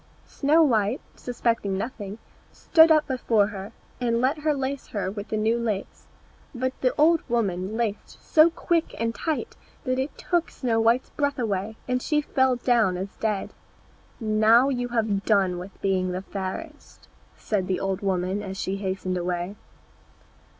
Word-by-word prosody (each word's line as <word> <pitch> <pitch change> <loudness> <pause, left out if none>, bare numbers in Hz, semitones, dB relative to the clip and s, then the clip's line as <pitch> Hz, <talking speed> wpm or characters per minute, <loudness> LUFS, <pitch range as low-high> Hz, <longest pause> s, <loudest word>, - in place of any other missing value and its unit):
Snow 305 +3 +3
white, 225 -3 +2 0.2
suspecting 230 -5 -1
nothing, 205 -2 -5 0.3
stood 325 0 +5
up 310 -1 +5
before 235 -5 +2
her, 200 0 -7 0.3
and 235 -2 +1
let 270 +5 +1
her 300 0 +1
lace 270 0 -3
her 195 -3 -3
with 205 +1 -6
the 215 - -2
new 225 +2 +1
lace; 215 -4 -4 0.5
but 260 +1 -1
the 255 - +3
old 325 +2 +5
woman 205 -3 -1
laced 220 -3 -3
so 315 +1 +5
quick 335 0 -1
and 230 0 0
tight 315 +5 -3 0.3
that 255 -3 -1
it 265 +3 -3
took 345 -2 0
Snow 235 -4 -1
white's 230 +3 +2
breath 285 -1 -1
away, 215 -3 -2
and 250 0 0
she 300 +3 +1
fell 260 -3 +2
down 235 -7 +2
as 190 +2 -6
dead. 210 -3 -2 0.7
"Now 220 +3 +4
you 245 -2 -1
have 220 -4 0
done 190 -5 +2
with 185 +2 -10
being 185 -2 +1
the 185 +1 -4
fairest," 200 - -7 0.3
said 195 -4 -1
the 185 - 0
old 195 0 -2
woman 190 0 -1
as 195 -1 -6
she 190 +1 -2
hastened 190 -2 -2
away. 175 +2 -3
225 Hz, 160 wpm, -25 LUFS, 195-260 Hz, 0.7 s, stood